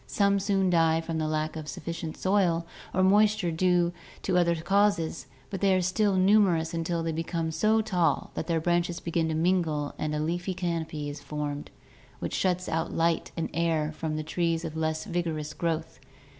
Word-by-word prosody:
Some 200 -1 +2
soon 195 -2 +1
die 165 -1 +4
from 165 0 -3
lack 155 0 -1
of 155 -1 -6
sufficient 165 +1 -5
soil 185 -4 +2 0.3
or 185 - +2
moisture 205 0 +4
or - - -2
due 175 +1 +2 0.3
to 190 - 0
other 170 -1 +3
causes, 170 -5 +1 0.2
but 195 - -4
they 195 -1 +4
are 185 - +2
still 195 +2 +2
numerous 185 -4 +3
until* 165 0 -1
they 165 - -1
become 165 0 -2
so 215 +7 +3
tall 175 -8 0
that - - -4
their 165 -2 +1
branches 175 +1 0
begin 165 -1 -1
to 160 - -1
mingle 160 -4 +1
and 150 0 -1
a - - -1
leafy 175 +4 -2
canopy 165 -4 -3
is 145 0 -6
formed 145 0 -4 0.5
which - - -4
shuts 180 -1 0
out 160 0 -1
light 165 0 0
and 165 - -2
air 160 -2 +1
from 155 0 -4
the 155 - -2
trees 165 +1 -1
of 160 -1 -5
less 160 0 -1
vigorous 160 -3 -2
growth. 165 -1 -3
165 Hz, 185 wpm, -28 LUFS, 160-185 Hz, 0.5 s, die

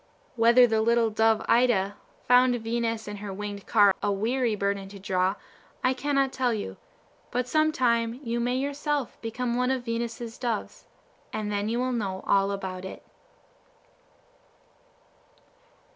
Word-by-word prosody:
Whether 235 +2 +6
the 220 -2 +1
little 230 0 +2
dove 220 0 +2
Ida 220 -5 +3 0.3
found 250 0 +5
Venus 230 -1 -2
and 205 -1 -6
her 205 -1 -6
winged 200 0 -6
car 205 -3 +5
a 205 - +1
weary 230 +3 0
burden 200 -1 -2
to 200 - -10
draw, 190 0 0 0.5
I 255 - +3
cannot 275 0 0
tell 250 -3 +1
you; 210 - -5 0.5
but 250 0 -1
some 310 +3 +2
time 235 -3 +1
you 235 0 -2
may 245 +1 0
yourself 285 0 -2
become 235 +1 -2
one 250 +1 +1
of 260 -2 -1
Venus's 230 0 -4
doves, 235 -4 -4 0.4
and 210 -1 -3
then 205 +1 -1
you 235 - -1
will 255 +1 0
know 195 -6 -3
all 195 0 +3
about 190 -2 -4
it. 190 - -8
230 Hz, 145 wpm, -27 LUFS, 205-250 Hz, 0.5 s, Whether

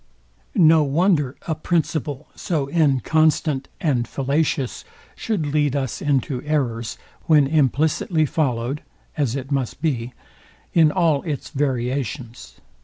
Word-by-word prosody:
No 160 -5 +6
wonder 150 -2 +2
a 160 - +1
principle 155 -3 -1
so 150 -6 -2
inconstant 155 -1 +2
and 135 - 0
fallacious 140 -1 -1 0.3
should 205 -9 -2
lead 145 -1 +1
us 135 -4 -2
into 135 -3 0
errors, 125 -7 -2 0.3
when 150 -3 +6
implicitly 155 +3 +2
followed 135 -2 -1 0.3
(as 135 -5 0
it 135 +1 -5
must 135 -3 -1
be) 125 -6 -2 0.6
in 160 -3 +5
all 165 -6 +2
its 150 -5 -5
variations. 130 -3 -3
145 Hz, 110 wpm, -22 LUFS, 130-155 Hz, 0.6 s, No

